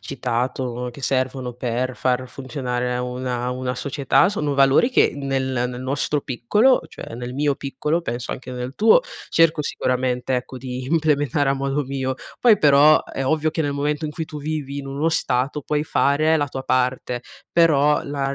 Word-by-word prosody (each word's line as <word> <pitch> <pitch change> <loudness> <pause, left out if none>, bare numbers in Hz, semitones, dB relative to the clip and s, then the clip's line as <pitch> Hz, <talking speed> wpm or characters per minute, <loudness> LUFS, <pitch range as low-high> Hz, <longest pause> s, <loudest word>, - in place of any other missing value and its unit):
citato, 125 -1 -3
che 140 - -12
servono 130 -2 -1
per 125 +1 -2
far 130 0 0
funzionare 125 -2 -3
una 125 0 -3
una 125 0 -3
società, 140 +6 +2
sono 150 -8 -1
valori 135 - +4
che - - +4
nel 135 -1 -1 0.3
nel 125 0 -6
nostro 140 +3 -1
piccolo, 205 - +2
cioè - - -9
nel 120 +1 -6
mio 145 +1 +1
piccolo 150 +4 -2
penso 120 -5 -4
anche 130 0 -8
nel 125 +1 -5
tuo, 225 - +5 0.3
cerco 165 -2 +3
sicuramente, 125 -2 -1
ecco, 125 +1 -4
di 125 0 -6
implementare 145 -2 +1
a 135 - +2
modo 140 +1 -1
mio. 130 -1 -2 0.3
Poi 225 -5 +5
però, 145 +1 +6
è 135 - -4
ovvio 155 +3 +1
che 160 - -1
nel 145 -1 -1
momento 145 +2 -1
in 150 - -2
cui 160 +1 -5
tu 150 - -7
vivi 145 -2 -4
in 140 - -6
uno 140 +4 -1
stato 140 -1 0
puoi 150 +2 -1
fare 155 +1 +2
la 145 -2 0
tua 135 -1 -6
parte, 125 -1 0 0.3
però 150 -3 +4
la 140 -1 -2
135 Hz, 175 wpm, -22 LUFS, 125-150 Hz, 0.3 s, però